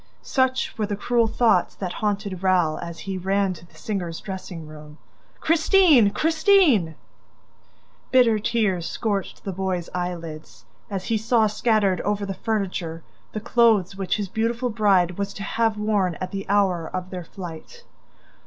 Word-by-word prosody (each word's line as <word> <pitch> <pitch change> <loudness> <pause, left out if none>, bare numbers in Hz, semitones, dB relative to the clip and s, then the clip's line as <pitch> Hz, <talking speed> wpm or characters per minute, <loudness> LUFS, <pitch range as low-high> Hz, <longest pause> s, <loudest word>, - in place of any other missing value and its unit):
Such 260 -1 0
were 210 - 0
the 205 - -2
cruel 235 +3 +1
thoughts 225 -6 +2
that 185 -2 -4
haunted 200 -3 -2
Raoul 180 -5 +2
as 170 -1 -7
he 190 -1 -4
ran 195 +1 +1
to 170 0 -14
the - - -24
singer's 180 -6 -4
dressing 185 -4 -7
room. 150 0 -12 0.4
"Christine! 320 - +5
Christine!" 315 - +3 1.1
Bitter 240 -4 +4
tears 210 -6 0
scorched 205 -4 -3
the 195 - -3
boy's 185 -2 -3
eyelids 165 -10 -6 0.2
as 195 -2 -4
he 225 -1 0
saw 225 0 +3
scattered 210 -3 +1
over 205 0 -1
the 195 - -3
furniture 185 -7 -3 0.3
the - - -2
clothes 220 -4 +3
which 195 0 -1
his 205 -2 -3
beautiful 230 +4 -1
bride 195 -5 +2
was 200 0 -3
to 200 - -6
have 225 +1 0
worn 205 -5 0
at 185 +3 -5
the 195 -1 -5
hour 190 -5 +2
of 185 0 -5
their 180 -2 -5
flight. 175 - -10
200 Hz, 155 wpm, -23 LUFS, 180-220 Hz, 1.1 s, Christine